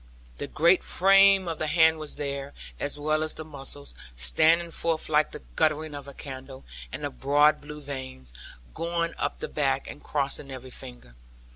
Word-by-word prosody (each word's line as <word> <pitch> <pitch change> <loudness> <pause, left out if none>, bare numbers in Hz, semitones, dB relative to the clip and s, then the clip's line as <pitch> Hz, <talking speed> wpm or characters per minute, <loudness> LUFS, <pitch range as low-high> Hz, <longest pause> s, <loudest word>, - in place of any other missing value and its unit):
The - - -3
great 170 +3 +4
frame 195 0 +5
of 165 -2 -3
the 155 - -1
hand 160 0 +4
was 155 -1 -4
there, 140 -1 -4 0.3
as 145 0 -1
well 155 +1 0
as 155 0 -2
the 155 - -7
muscles, 135 - -7 0.2
standing 160 - +3
forth 165 -1 0
like 150 0 +3
the - - -8
guttering 155 0 +1
of 140 -1 -7
a 140 - -9
candle, 130 -1 -9 0.3
and - - -6
the - - -2
broad 145 - +3
blue 150 +1 -9
veins, 130 - -7 0.4
going 170 0 -2
up - - -2
the - - -2
back, 135 -2 0
and - - -10
crossing 140 -1 -2
every 130 -1 -8
finger. - - -7
150 Hz, 175 wpm, -27 LUFS, 135-160 Hz, 0.4 s, frame